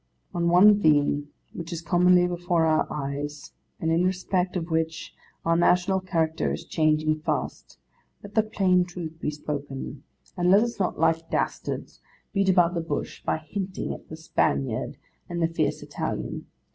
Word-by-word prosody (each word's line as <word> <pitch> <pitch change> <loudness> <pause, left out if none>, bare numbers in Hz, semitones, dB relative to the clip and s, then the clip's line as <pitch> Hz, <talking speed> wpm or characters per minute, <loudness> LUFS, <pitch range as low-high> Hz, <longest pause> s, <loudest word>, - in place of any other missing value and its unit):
On 170 0 +1
one 205 +4 +7
theme, 145 -2 +3 0.2
which 165 0 -7
is 170 -1 -5
commonly 180 +1 +4
before 175 -1 +1
our 155 -1 +2
eyes, 145 +1 -5 0.3
and 160 - 0
in 165 +2 +3
respect 185 0 0
of 170 -1 -3
which 160 0 -2 0.3
our 165 0 +3
national 180 +2 +3
character 165 -4 0
is - - -5
changing 155 0 +1
fast, 155 - -3 0.5
let 205 0 -10
the 220 - +5
plain 190 -4 +2
Truth 175 -2 -7
be 150 - -1
spoken, 145 -2 -5 0.3
and 180 -1 +1
let 200 +4 +6
us 235 -2 -4
not, 185 - 0
like 165 0 +1
dastards, - - -3 0.3
beat 195 -1 +2
about 175 -2 +4
the 170 - -1
bush 165 - -4
by - - 0
hinting 185 +5 -4
at - - -12
the 155 - -7
Spaniard 70 - -1 0.3
and 175 -1 -3
the 165 - +3
fierce 165 - -1
Italian. - - -4
170 Hz, 160 wpm, -26 LUFS, 155-180 Hz, 0.5 s, one